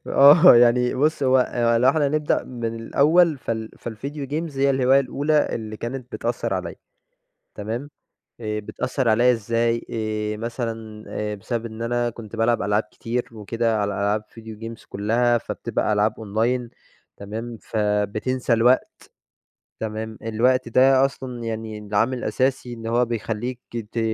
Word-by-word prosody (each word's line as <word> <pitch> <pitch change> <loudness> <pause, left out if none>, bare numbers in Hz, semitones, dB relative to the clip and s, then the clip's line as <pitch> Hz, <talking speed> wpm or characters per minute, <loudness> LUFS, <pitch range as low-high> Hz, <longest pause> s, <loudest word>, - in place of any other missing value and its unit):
آه، 145 +1 +8
يعني 120 +1 +4
بُص 145 +2 +1
هو 130 0 +4 0.4
لو 125 - +5
إحنا 145 0 +3
نبدأ 150 0 0
من 120 -2 -7 0.2
الأوّل 155 +6 +3
فال 110 -2 -4
فالvideo 135 +5 -6
games 155 -2 -3
هي 140 +1 +3
الهواية 135 0 +4
الأولى 145 +3 +1
اللي 110 -1 -5
كانت 125 +2 -6
بتأثر 115 -4 -2
عليَّ. 90 -2 -4 0.8
تمام؟ 115 +7 -5 0.5
آآ، 105 -1 -3
بتأثر 125 +4 -2
عليَّ 120 +3 +5
إزاي؟ 115 +1 0
آآ، 110 -1 -2
مثلًا 115 -2 -5
آآ، 105 0 -3
بسبب 115 +3 -4
إن 110 0 -7
أنا 120 0 0
كنت 115 -1 -10
بالعب 115 +1 +2
ألعاب 105 +1 +1
كتير 120 +1 -3
وكده 115 +1 -1
على 100 0 -1
ألعاب 105 +2 0 0.2
video 110 -1 -9
games 115 0 -8
كلّها 120 +4 +1
فبتبقى 115 -1 -2
ألعاب 105 +1 +2
أونلاين 115 +3 -1 0.5
تمام، 115 +3 -6
فبتنسى 105 +4 -1
الوقت 120 +3 +4 0.9
تمام، 110 0 -5
الوقت 120 +3 +1
ده 130 +2 +5
أصلًا 125 -3 -5
يعني 110 -1 -4
العامل 105 +5 0
الأساسي 130 -1 -1
إن 115 -1 -7
هو 120 +2 +2
بيخلّيك 115 +2 -3 0.3
ت 115 - -2
115 Hz, 140 wpm, -23 LUFS, 110-130 Hz, 0.9 s, آه